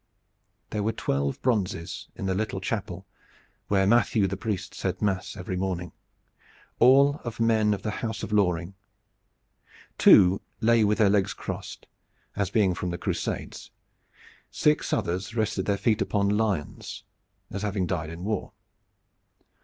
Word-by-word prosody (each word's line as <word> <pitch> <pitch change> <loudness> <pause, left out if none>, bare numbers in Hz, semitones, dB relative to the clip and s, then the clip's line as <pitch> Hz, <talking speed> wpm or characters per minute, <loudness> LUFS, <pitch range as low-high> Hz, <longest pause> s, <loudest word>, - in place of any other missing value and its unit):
There 105 - -1
were 110 +2 0
twelve 70 0 -1
bronzes 95 -8 -1
in - - -5
the 95 - 0
little 105 0 -2
chapel 95 -2 -4 0.6
where 95 -1 +2
Matthew 115 0 +3
the 95 +1 -1
priest 95 -2 -4
said 95 -1 -3
mass 95 -5 -1
every 90 0 -4
morning, 90 -1 -3 0.9
all 140 +4 +5
of 120 -1 -6
men 110 -2 +3
of 100 - -2
the 110 - -1
house 110 -2 -3
of - - -5
Loring. 90 -3 +1 1.3
Two 95 +1 +7 0.2
lay 115 0 +4
with 105 0 +2
their 100 -2 +4
legs 100 -1 +1
crossed, - - -7 0.5
as 100 -3 -1
being 100 -5 +2
from 90 +1 -3
the 85 - -3
Crusades. - - -4 0.8
Six 150 0 +1
others 95 +6 -2
rested 105 -4 -1
their 100 -1 +1
feet 110 +1 +1
upon 100 -1 +1
lions, 105 -7 -2 0.5
as 100 - -4
having 100 -3 -1
died 80 -3 -2
in 85 +2 -8
war. 110 +2 -3
100 Hz, 145 wpm, -26 LUFS, 90-110 Hz, 1.3 s, Two